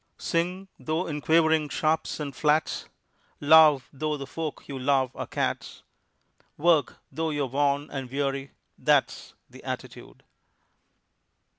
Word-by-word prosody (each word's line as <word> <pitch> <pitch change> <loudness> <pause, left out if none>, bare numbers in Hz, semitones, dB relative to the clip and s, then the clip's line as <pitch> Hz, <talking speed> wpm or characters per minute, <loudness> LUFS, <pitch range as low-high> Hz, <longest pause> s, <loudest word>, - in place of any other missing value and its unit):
Sing 180 +3 -2
though 160 +3 -2
in 150 -2 -4
quavering 160 -1 +3
sharps 155 +2 -1
and 145 -2 -5
flats, 150 +1 0 0.5
Love 150 -3 +6
though 150 +2 -2
the 140 - -6
folk 155 +2 -5
you 135 -2 -6
love 130 -1 +1
are - - -5
cats, - - -3 0.7
Work 160 -1 +2
though 160 0 -2
you're 145 -2 -1
worn 140 +2 0
and 135 -3 -5
weary 135 0 -2 0.3
that's - - +1
The - - -15
attitude. - - -8
150 Hz, 125 wpm, -26 LUFS, 140-160 Hz, 0.7 s, Love